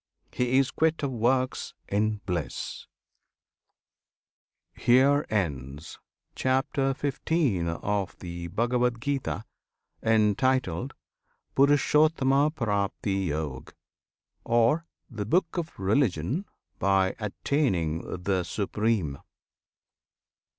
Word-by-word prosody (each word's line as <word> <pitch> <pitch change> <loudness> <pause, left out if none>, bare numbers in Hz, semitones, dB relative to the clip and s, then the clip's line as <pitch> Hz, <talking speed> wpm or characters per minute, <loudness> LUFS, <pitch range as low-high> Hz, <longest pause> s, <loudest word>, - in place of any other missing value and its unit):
He 125 +1 +1
is 135 0 +3
quit 160 -1 +1
of 140 - 0
works 130 +2 0
in 105 +1 0
bliss! 90 -6 -4 1.9
HERE 135 +4 +4
ENDS 75 - -3 0.3
CHAPTER 135 +1 0
XV. 140 - 0
OF 100 +3 -2
THE 85 -1 -6
BHAGAVAD 120 +4 +1
GITA 135 -4 -2 0.6
Entitled 110 -3 +1 0.6
"Purushottamapraptiyog," 130 - +1 0.7
Or 120 +8 +2 0.2
"The 110 -5 -5
Book 180 - +1
of 170 -2 -4
Religion 105 - +1 0.3
by 95 -1 +2
attaining 95 - -1
the 95 -1 +1
Supreme." 100 -4 -1
115 Hz, 75 wpm, -27 LUFS, 95-135 Hz, 1.9 s, HERE